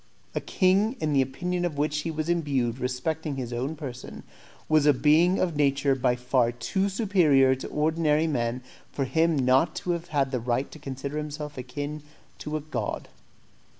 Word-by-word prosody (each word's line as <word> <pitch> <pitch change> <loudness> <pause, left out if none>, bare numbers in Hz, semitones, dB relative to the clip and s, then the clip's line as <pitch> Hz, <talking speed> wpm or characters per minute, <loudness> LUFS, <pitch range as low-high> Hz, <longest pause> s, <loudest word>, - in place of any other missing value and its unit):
A - - -2
king, 195 +5 +2
in 155 -1 0
the 135 - +4
opinion 175 +7 -2
of 165 -5 -2
which 150 +1 0
he 155 - -3
was 155 0 -3
imbued 140 -8 0
respecting 150 +4 -2
his 125 -3 -5
own 130 +6 -2
person, 130 -5 -8 0.4
was 155 -1 +3
a 145 - +7
being 160 +7 +4
of 180 -3 0
a - - -10
nature 140 -1 +2
by 125 -2 +1
far 125 -1 +1
too 190 +11 -1
superior 175 - +4
to 130 - -5
ordinary 155 0 +1
men 125 -4 -1 0.3
for 135 - -2
him 160 +4 +2
not 130 +5 +3
to 180 - -2
have 150 -6 -1
the 130 - -1
right 120 +3 -1
to 155 - -11
consider 140 +1 -5
himself 150 0 -6
akin 145 +4 -5 0.4
to 150 +1 -3
a - - -6
god. 125 -8 -4
150 Hz, 180 wpm, -26 LUFS, 130-160 Hz, 0.4 s, a